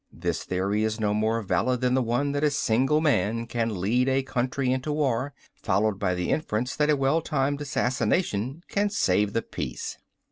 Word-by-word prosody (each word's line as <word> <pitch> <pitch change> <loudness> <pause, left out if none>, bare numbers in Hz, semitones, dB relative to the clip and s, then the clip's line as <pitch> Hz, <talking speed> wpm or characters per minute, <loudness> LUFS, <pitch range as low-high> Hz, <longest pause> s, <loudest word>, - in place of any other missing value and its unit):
This - - -3
theory 100 +3 0
is 110 0 -1
no 105 -1 +1
more 110 +2 0
valid 125 +5 0
than 125 0 +2
the 130 - +3
one 125 +4 0
that 145 +1 -1
a 150 - +4
single 140 +1 +2
man 115 -7 +1
can 115 -4 -2
lead 120 +8 +2
a 135 0 +2
country 130 0 -1
into 130 +3 -1
war, 140 -3 0 0.2
followed 105 -1 0
by 90 -3 0
the 90 0 -2
inference 125 -4 -1
that 150 0 +1
a 150 - +5
well 135 +4 +2
timed 145 -2 -1
assassination 130 - -1
can 205 +1 0
save 100 - +1
the 115 - 0
peace." - - -5
125 Hz, 185 wpm, -26 LUFS, 110-140 Hz, 0.2 s, a